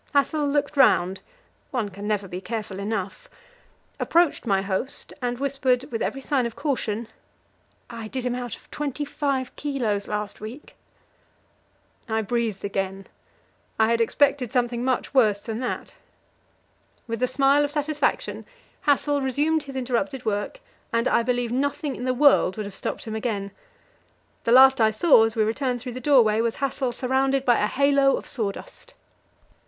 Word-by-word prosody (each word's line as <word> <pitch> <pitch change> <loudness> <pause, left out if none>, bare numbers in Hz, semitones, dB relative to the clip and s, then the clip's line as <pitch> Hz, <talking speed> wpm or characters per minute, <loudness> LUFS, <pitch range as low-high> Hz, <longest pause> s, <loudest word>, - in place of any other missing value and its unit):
Hassel 290 +1 +2
looked 285 0 -1
round 190 -8 +4 0.5
one 235 -6 -2
can 200 +2 -8
never 205 -2 -1
be 180 0 -6
careful 210 -3 -5
enough 200 -2 -4 0.7
approached 335 -7 +2
my 195 -2 +2
host, 200 +7 -4
and 245 -1 -2
whispered, 265 -2 0
with 225 - -3
every 270 - -2
sign 265 -3 0
of 230 - -9
caution 235 -6 -2 0.8
"I 230 -2 -7
did 255 +2 -4
him 250 - 0
out 245 -2 -4
of - - -22
twenty 295 0 -3
five 275 -3 -2
kilos 240 -9 -2
last 210 -1 -4
week." 235 +8 -9 1.3
I 220 0 0
breathed 225 -2 -2
again; 195 -1 -3 0.7
I 220 +1 +3
had 230 0 +2
expected 270 0 +2
something 240 -2 0
much 260 +1 -1
worse 215 -7 +4
than 220 +2 -5
that. 250 - -4 1.1
With 230 0 -4
a 255 - +3
smile 275 +2 +3
of 290 - 0
satisfaction 295 0 -1 0.4
Hassel 285 0 +2
resumed 290 +4 +1
his 275 -2 -10
interrupted 260 +1 -2
work, 215 - -2 0.3
and 230 +2 +1
I - - +3
believe 245 0 -1
nothing 285 +3 -1
in 250 - -5
the 255 0 0
world 265 -8 +4
would 215 - -3
have 200 - -8
stopped - - -4
him 220 - -5
again. 215 -3 -3 0.9
The 230 - +2
last 265 0 +7
I 220 - +6
saw 225 +1 +5
as 225 - -3
we 220 - +3
returned 245 +3 -1
through 250 +1 -7
the 255 - -6
doorway 235 -5 +4
was 230 -1 0
Hassel 270 -2 -1
surrounded 265 +2 0
by 240 -2 +4
a 210 - +2
halo 275 +2 +3
of - - -8
sawdust. 265 - -5
245 Hz, 160 wpm, -24 LUFS, 220-275 Hz, 1.3 s, last